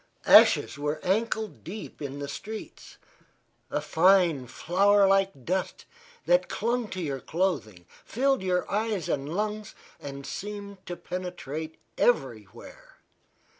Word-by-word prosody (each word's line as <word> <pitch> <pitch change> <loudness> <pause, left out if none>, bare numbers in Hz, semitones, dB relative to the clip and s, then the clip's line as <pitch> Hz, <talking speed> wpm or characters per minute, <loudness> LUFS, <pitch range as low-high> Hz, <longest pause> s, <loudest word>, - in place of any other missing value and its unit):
Ashes - - +6
were 150 +1 -2
ankle 220 +3 0
deep 190 +3 -10
in 140 -1 -5
the 145 0 -5
streets 215 +10 -8 0.7
a - - -1
fine, 170 -6 +3
flour 195 - +3
like 195 -9 +1
dust 185 +1 -2 0.4
that - - +3
clung 240 0 -1
to 190 - -6
your 140 -6 -3
clothing, 140 - -2 0.2
filled 270 +3 +1
your 180 -1 0
eyes 210 -4 -1
and 140 +1 -2
lungs 210 +3 -3 0.2
and 140 -1 -8
seemed 200 0 -7
to 175 - -4
penetrate 160 -4 -6 0.2
everywhere. 120 - -2
185 Hz, 120 wpm, -27 LUFS, 145-205 Hz, 0.7 s, Ashes